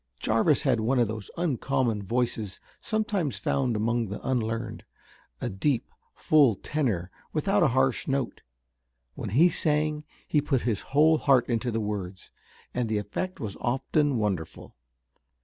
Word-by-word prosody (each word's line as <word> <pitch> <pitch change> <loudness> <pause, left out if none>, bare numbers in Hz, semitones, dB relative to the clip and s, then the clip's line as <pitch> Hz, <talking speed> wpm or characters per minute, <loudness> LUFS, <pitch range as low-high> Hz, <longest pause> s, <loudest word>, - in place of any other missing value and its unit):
Jarvis 115 +7 +2
had 130 -5 +2
one 120 +5 +1
of 120 -2 +3
those 110 -1 -6
uncommon 135 -8 0
voices 110 -1 -2 0.2
sometimes 205 - -1
found 125 +4 0
among 115 +2 0
the 100 +2 -5
unlearned, 115 -3 -2 0.6
a - - -2
deep, 120 +6 -1 0.2
full 145 -8 +4
tenor 105 - -2 0.2
without 195 +6 +2
a 170 - +6
harsh 130 0 +1
note. 135 -2 -1 0.7
When - - -5
he 150 - +5
sang 150 -2 0 0.2
he 150 - +2
put 135 -4 0
his 115 -5 -1 0.2
whole 155 +1 +6
heart 135 -4 +4
into 120 0 0
the 115 -1 -1
words, 100 -3 -5 0.4
and 125 -2 -1
the 110 - +1
effect 105 - -4
was 105 -3 -5
often 135 +2 +1
wonderful. 95 -7 -3
125 Hz, 145 wpm, -27 LUFS, 110-150 Hz, 0.7 s, a